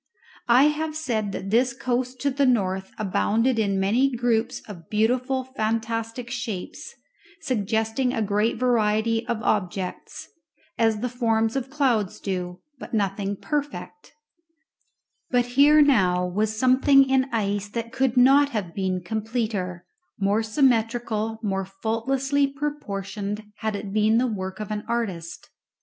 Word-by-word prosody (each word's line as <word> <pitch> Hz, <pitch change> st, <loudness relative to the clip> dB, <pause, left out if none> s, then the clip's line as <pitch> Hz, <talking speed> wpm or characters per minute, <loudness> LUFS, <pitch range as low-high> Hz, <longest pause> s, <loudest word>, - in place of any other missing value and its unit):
I 245 Hz, +3 st, +7 dB
have 305 Hz, +1 st, 0 dB
said 225 Hz, -10 st, -2 dB
that 195 Hz, 0 st, -5 dB
this 245 Hz, +2 st, +3 dB
coast 250 Hz, +1 st, -2 dB
to 280 Hz, -, +1 dB
the 275 Hz, +1 st, +2 dB
north 190 Hz, -5 st, 0 dB
abounded 220 Hz, +4 st, +1 dB
in 200 Hz, -3 st, +1 dB
many 230 Hz, +8 st, +3 dB
groups 240 Hz, 0 st, 0 dB
of 175 Hz, -6 st, -11 dB
beautiful 250 Hz, +5 st, +1 dB
fantastic 230 Hz, -1 st, -3 dB
shapes, 225 Hz, -6 st, -5 dB, 0.5 s
suggesting 225 Hz, +1 st, 0 dB
a 225 Hz, -, -1 dB
great 210 Hz, +3 st, 0 dB
variety 225 Hz, -1 st, +1 dB
of 225 Hz, -2 st, -2 dB
objects, 185 Hz, -2 st, -2 dB, 0.5 s
as 225 Hz, -2 st, +1 dB
the 250 Hz, -, 0 dB
forms 225 Hz, -2 st, 0 dB
of 270 Hz, -1 st, -2 dB
clouds 255 Hz, -9 st, 0 dB
do, 180 Hz, -2 st, -4 dB, 0.2 s
but -, -, -5 dB
nothing 200 Hz, -1 st, -1 dB
perfect; 295 Hz, -, -5 dB, 1.2 s
but 245 Hz, -1 st, +2 dB
here 295 Hz, +3 st, +7 dB
now 185 Hz, -10 st, +3 dB
was 210 Hz, +4 st, -1 dB
something 265 Hz, +3 st, +5 dB
in 265 Hz, 0 st, +3 dB
ice 205 Hz, -2 st, -1 dB
that 230 Hz, +1 st, -4 dB
could 260 Hz, -2 st, 0 dB
not 275 Hz, +3 st, +6 dB
have 205 Hz, -9 st, -4 dB
been 185 Hz, -2 st, -2 dB
completer, 215 Hz, -3 st, -3 dB, 0.3 s
more 200 Hz, +2 st, +2 dB
symmetrical, 225 Hz, -2 st, +1 dB
more 195 Hz, -2 st, -1 dB
faultlessly 255 Hz, +8 st, 0 dB
proportioned 210 Hz, -8 st, -4 dB
had 220 Hz, -1 st, -2 dB
it 200 Hz, -1 st, -6 dB
been 215 Hz, +1 st, +3 dB
the 250 Hz, -, +3 dB
work 190 Hz, -4 st, -4 dB
of 215 Hz, -1 st, -5 dB
an 210 Hz, 0 st, -3 dB
artist. 195 Hz, -8 st, -4 dB
225 Hz, 135 wpm, -24 LUFS, 205-255 Hz, 1.2 s, I